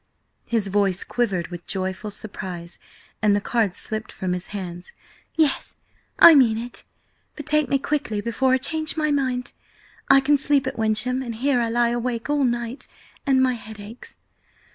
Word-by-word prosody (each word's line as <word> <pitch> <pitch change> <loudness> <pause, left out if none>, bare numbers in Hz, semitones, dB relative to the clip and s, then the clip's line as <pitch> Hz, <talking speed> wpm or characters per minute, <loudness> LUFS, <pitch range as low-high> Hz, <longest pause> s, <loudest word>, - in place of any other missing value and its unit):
His 225 -3 0
voice 195 -1 +1
quivered 200 -8 -1
with 175 -1 -9
joyful 190 +2 -3
surprise, 185 -5 -6 0.4
and 210 -2 +4
the - - +2
cards 210 -3 0
slipped 215 0 -3
from 185 -1 -3
his 180 0 -2
hands. 180 -3 -7 0.4
"Yes, 310 -4 +1 0.4
I 335 - +10
mean 245 -7 +5
it! 235 +2 -6 0.5
But 295 - -8
take 305 0 +2
me 275 - +3
quickly 270 -6 -2
before 235 +4 0
I - - +5
change 315 +4 -1
my 305 -1 +1
mind! 260 -2 -1 0.6
I 275 - +8
can 285 +1 +3
sleep 280 -1 +2
at 265 - -3
Wyncham, 225 +4 +1
and 235 -3 -5
here 260 +2 +1
I 230 - 0
lie 240 +1 +2
awake 240 +2 -2
all 290 -1 +2
night, 240 +1 -3 0.4
and 260 -1 +4
my 255 -1 +2
head 220 -2 -9
aches. 210 +4 -11
235 Hz, 170 wpm, -23 LUFS, 205-265 Hz, 0.6 s, I